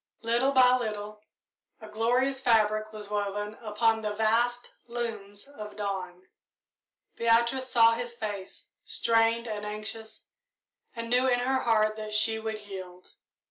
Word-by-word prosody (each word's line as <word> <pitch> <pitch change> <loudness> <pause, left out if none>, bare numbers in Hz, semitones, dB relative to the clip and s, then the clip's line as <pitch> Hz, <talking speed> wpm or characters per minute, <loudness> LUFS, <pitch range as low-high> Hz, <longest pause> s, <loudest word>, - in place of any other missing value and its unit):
Little 240 +4 +2
by 255 -2 +6
little 210 -2 -5 0.6
a 220 - -11
glorious 245 +5 0
fabric 215 -3 +2
was 210 -1 -7
woven 205 0 -2
upon 225 +1 +1
the 210 -1 -2
vast 235 +3 +1 0.2
looms 220 -3 -5
of 210 -7 -9
dawn. 185 -3 -5 0.9
Beatrice 235 +3 +2
saw 230 -2 +6
his 235 0 -4
face, 205 -4 -7
strained 230 0 +1
and 210 -2 -4
anxious, 215 +1 -6 0.7
and 230 0 -5
knew 250 +1 +4
in 245 -1 +3
her 260 +2 +1
heart 215 -3 +2
that 215 -1 -4
she 220 +1 +3
would 220 -1 -4
yield. 185 -3 -10
220 Hz, 135 wpm, -28 LUFS, 210-235 Hz, 0.9 s, by